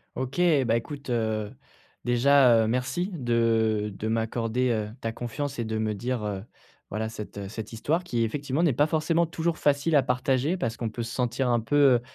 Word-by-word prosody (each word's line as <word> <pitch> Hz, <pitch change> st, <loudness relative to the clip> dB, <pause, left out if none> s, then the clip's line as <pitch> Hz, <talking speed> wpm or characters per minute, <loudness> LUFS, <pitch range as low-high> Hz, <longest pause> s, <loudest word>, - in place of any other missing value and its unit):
OK, 130 Hz, +6 st, -2 dB, 0.2 s
bah, 115 Hz, -, +2 dB
écoute, 140 Hz, +3 st, -5 dB
heu, 110 Hz, -3 st, -1 dB, 0.5 s
déjà, 120 Hz, -2 st, +5 dB
heu, -, -, -1 dB
merci 130 Hz, -, -1 dB
de 115 Hz, -, +1 dB
de 110 Hz, -, -3 dB
m'accorder, 115 Hz, +2 st, 0 dB
heu, 110 Hz, -2 st, -1 dB
ta 115 Hz, -2 st, -3 dB
confiance 135 Hz, +4 st, -4 dB
et 120 Hz, -, -1 dB
de 110 Hz, 0 st, -3 dB
me 110 Hz, -1 st, 0 dB
dire, 120 Hz, +1 st, -3 dB
heu, 100 Hz, -1 st, -3 dB, 0.5 s
voilà 110 Hz, +2 st, -2 dB
cette, 105 Hz, -2 st, -8 dB
heu, 100 Hz, -1 st, -5 dB
cette 110 Hz, +2 st, -7 dB
histoire 155 Hz, +10 st, -1 dB
qui 120 Hz, -9 st, -1 dB
effectivement 140 Hz, +5 st, -2 dB
n'est 160 Hz, -7 st, +3 dB
pas 145 Hz, +5 st, +3 dB
forcément 165 Hz, +2 st, +1 dB
toujours 165 Hz, 0 st, -2 dB
facile 145 Hz, +2 st, +2 dB
à 140 Hz, -, +5 dB
partager, 130 Hz, +6 st, +1 dB
parce 115 Hz, -9 st, -2 dB
qu'on 115 Hz, -2 st, -3 dB
peut 120 Hz, +2 st, -5 dB
se 120 Hz, +2 st, -6 dB
sentir 125 Hz, +1 st, 0 dB
un 120 Hz, -1 st, +2 dB
peu, 130 Hz, +6 st, -2 dB, 0.2 s
heu, 120 Hz, -, 0 dB
120 Hz, 200 wpm, -26 LUFS, 110-140 Hz, 0.5 s, déjà